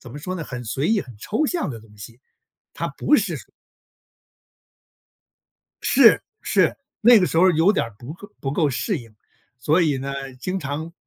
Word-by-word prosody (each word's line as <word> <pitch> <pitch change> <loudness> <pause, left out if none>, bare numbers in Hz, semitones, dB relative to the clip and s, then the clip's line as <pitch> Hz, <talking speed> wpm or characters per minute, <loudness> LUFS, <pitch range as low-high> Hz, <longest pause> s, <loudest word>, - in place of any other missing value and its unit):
怎 120 - -12
么 145 - -8
说 185 +5 -5
呢， 170 - -4
很 125 -5 -7
随 135 +7 -2
意、 220 -3 +2
很 125 - -13
抽 215 - -1
象 345 +3 -1
的 115 -5 -7
东 105 -1 -19
西， 115 +5 -12 0.5
它 - - -3
不 - - +3
是 - - -1
说 - - -11 2.4
是， - - +6 0.2
是， - - +2 0.3
那 235 0 +7
个 185 - +2
时 165 - -2
候 185 +2 +6
有 165 +5 +4
点 200 - 0
儿 115 -3 -12
不 125 +7 -9 0.3
不 135 - -2
够 150 0 +1
适 140 - -2
应。 115 -4 -13 0.5
所 155 +8 +2
以 150 -5 +1
呢， 135 0 -5
经 185 +6 -3
常 150 +3 -5
145 Hz, 195 characters per minute, -22 LUFS, 125-180 Hz, 2.4 s, 那